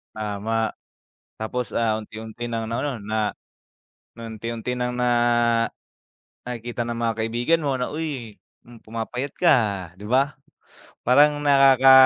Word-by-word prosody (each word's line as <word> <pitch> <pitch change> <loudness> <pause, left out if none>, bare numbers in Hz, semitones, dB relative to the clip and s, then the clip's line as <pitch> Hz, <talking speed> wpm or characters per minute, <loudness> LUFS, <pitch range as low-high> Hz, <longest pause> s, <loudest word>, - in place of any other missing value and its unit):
Tama, 110 +1 -1 0.7
tapos, 120 +3 -3
ah, 110 -1 0
unti-unti 110 +2 -7
nang 115 -1 -2
ano 125 +4 -2
na, 110 0 -1 0.8
unti-unti 115 +2 -5
nang 125 0 -1
na 125 0 +1 1.3
nakikita 120 0 -4
ng 115 0 -4
mga 115 -1 +1
kaibigan 120 +8 +1
mo 135 -3 0
na, 125 - 0
"Uy 145 -9 -4 0.5
pumapayat 115 +5 -4
ka, 180 - +1
ah, 100 -6 +2 0.2
di - - -10
ba? 135 +5 +2 0.7
Parang 145 +3 +5
nakaka 135 -2 +6
120 Hz, 120 wpm, -24 LUFS, 110-130 Hz, 1.3 s, nakaka